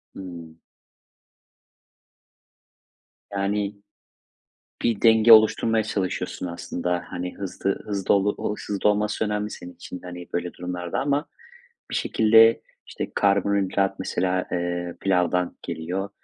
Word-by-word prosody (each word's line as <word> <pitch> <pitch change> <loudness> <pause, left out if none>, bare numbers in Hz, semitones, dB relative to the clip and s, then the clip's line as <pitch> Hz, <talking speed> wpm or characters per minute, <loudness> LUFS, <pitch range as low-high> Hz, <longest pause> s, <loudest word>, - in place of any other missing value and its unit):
Hımm. 85 -3 -9 2.7
Yani, 100 +1 -1 1.1
bir 115 -3 +1
denge 115 0 +7
oluşturmaya 110 0 +5
çalışıyorsun 95 -3 -3
aslında. 85 +1 -3
Hani, 90 0 -5
hızlı, 95 0 -2
hızlı, 100 -2 +1
olu 105 +1 0
hızlı 105 0 +1
olması 105 +1 0
önemli, 105 0 -2
senin 90 -3 -9
için 90 +1 -9
de, - - -10
hani, 90 0 -8
böyle 85 -1 -2
durumlarda 90 -1 -4
ama 140 +2 0 0.7
bir - - -2
şekilde, 115 +1 +5 0.3
işte, - - -5
karbonhidrat 100 -1 +1
mesela, 95 -1 -1
eee, 85 0 -2
pilavdan 90 -2 +1
geliyor. 90 +5 -4
95 Hz, 105 wpm, -24 LUFS, 90-105 Hz, 2.7 s, denge